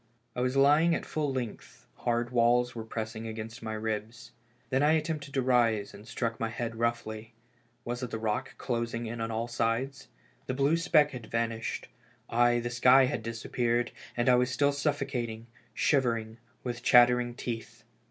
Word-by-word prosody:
I 125 - -1
was 130 +2 0
lying 150 +5 +5
at - - -4
full 150 -3 -1
length, 125 -4 -6
hard 120 0 -1
walls 120 0 +3
were 115 - -5
pressing 110 0 -5
against 110 +1 -7
my 110 -1 -4
ribs. 110 +1 -4 0.4
Then 135 +1 +2
I 150 +2 +5
attempted 155 -2 -1
to 135 - +2
rise 115 -5 +2
and 105 +2 -13
struck 115 -2 -3
my 115 - -1
head 115 0 -4
roughly. 115 -1 -2 0.5
Was 120 +1 -3
it 125 - -3
the 115 - -3
rock 110 -1 -2
closing 115 -1 -2
in 115 +1 -5
on 115 - -2
all 115 +1 -2
sides? 120 +3 -1 0.4
The 130 - -2
blue 140 +4 +3
speck 165 -3 +4
had 120 -4 -8
vanished 115 0 -2 0.3
— - - -37
aye, 120 0 +4
the 120 0 -3
sky 125 +2 +6
had 125 - -2
disappeared 120 +1 -1
— - - -17
and 120 - +1
I 125 - +7
was 125 0 +3
still 140 +3 +2
suffoca 140 -4 -1
ting, 110 0 -8 0.3
shivering, 115 -5 +1 0.2
with 125 -1 -4
chattering 120 0 +5
teeth. 115 -1 -6
120 Hz, 180 wpm, -29 LUFS, 115-130 Hz, 0.5 s, I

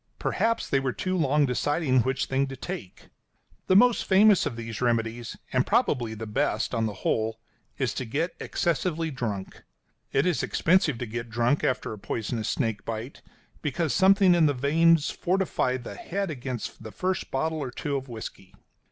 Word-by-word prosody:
Perhaps 230 0 0
they 135 - +2
were 135 -2 -1
too 185 0 -2
long 150 -3 +3
deciding 135 +1 +1
which 130 +2 0
thing 135 +1 0
to 135 - -7
take. 160 - -8 0.6
The 185 - +4
most 245 +3 +5
famous 200 +1 +5
of - - -4
these 115 0 -6
remedies, 115 -1 -1 0.2
and - - +3
probably 120 -4 +1
the 110 +1 -6
best, 135 +7 -1
on 115 -2 +1
the 105 - -4
whole, 110 0 0 0.4
is 130 -6 0
to 130 - -4
get 155 +9 -2
excessively 165 -1 -1
drunk. 105 -8 -4 0.5
It 135 - +2
is 180 -3 +1
expensive 165 -6 +2
to 125 - -4
get 115 +1 -5
drunk 120 +5 +1
after 130 - 0
a 105 - -9
poisonous 110 +1 -3
snake 115 -6 -1
bite, 115 +4 -6 0.4
because 155 +1 -1
something 195 -1 +5
in 170 -3 +5
the 145 - +1
veins 160 +4 +3
fortifies 175 -9 0
the 110 - -7
head 195 - -3
against 125 -5 -5
the 110 -1 -8
first 185 - -2
bottle 160 +4 -1
or 135 -4 -3
two 140 +3 -3
of 135 0 -3
whisky. 110 -4 -8
135 Hz, 175 wpm, -27 LUFS, 115-165 Hz, 0.6 s, most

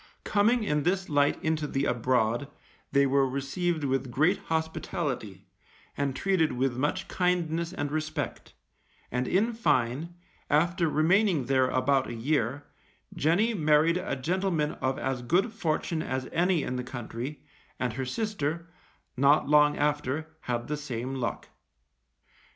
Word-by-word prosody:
Coming 220 +3 +2
in 150 -6 +1
this 185 +4 0
light 145 -1 +3
into 155 -1 0
the 140 0 -1
abroad, 120 +1 +1 0.4
they 140 0 +4
were 135 0 +2
received 155 +5 -2
with 135 -1 0
great 155 +10 +2
hospitality, 150 - -3 0.5
and 140 -2 -1
treated 185 -3 +1
with 125 0 0
much 150 +9 -1
kindness 170 -2 0
and 145 -3 -3
respect; 155 -1 -4 0.6
and 125 +1 -1
in 220 +6 +2
fine, 155 - 0 0.3
after 170 +3 +2
remaining 165 - +2
here 130 -1 +3
about 130 +1 +1
a 120 - -5
year, 135 +2 -1 0.5
Jenny 195 +10 +2
married 155 -1 +3
a 180 -5 -2
gentleman 165 +2 0
of 130 0 0
as 130 -2 -2
good 185 - +1
fortune 165 -4 -1
as 130 -2 -3
any 175 -2 +2
in 125 - -3
the 125 - -3
country, 125 +2 -6 0.4
and 125 -3 -1
her 130 +2 -3
sister, 170 - -3 0.4
not 140 +3 +4
long 150 0 +5
after, 150 +2 -1
had 120 -4 -3
the 150 - -2
same 130 -3 -4
luck. 130 -3 -3
150 Hz, 140 wpm, -28 LUFS, 130-170 Hz, 0.6 s, long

